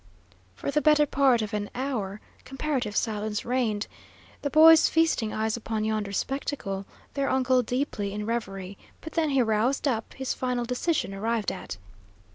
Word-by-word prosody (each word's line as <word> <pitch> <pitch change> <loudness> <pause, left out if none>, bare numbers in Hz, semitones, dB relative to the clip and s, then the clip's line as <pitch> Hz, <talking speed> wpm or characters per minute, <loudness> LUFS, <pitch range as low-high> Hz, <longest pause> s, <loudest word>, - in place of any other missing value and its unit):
For 190 - -3
the 300 - +2
better 300 -1 +5
part 265 -5 +3
of 215 +1 -6
an 205 -1 -2
hour 225 -7 -3 0.2
comparative 270 -6 -2
silence 210 -1 -1
reigned, 230 -4 0 0.6
the 285 - -1
boys 315 +2 +7
feasting 320 -9 +2
eyes 220 0 -1
upon 220 -2 -3
yonder 215 -2 -1
spectacle, 200 -5 -3 0.3
their 275 -1 0
uncle 260 -1 +3
deeply 245 -4 -2
in 210 +1 -4
reverie; 195 -4 -4 0.2
but 320 - -8
then 325 -2 +1
he 270 -3 +3
roused 230 +6 +1
up, 225 -5 -2
his 265 -1 -2
final 250 -2 -2
decision 250 - -1
arrived 220 +1 -1
at. - - -7
235 Hz, 155 wpm, -27 LUFS, 210-275 Hz, 0.6 s, boys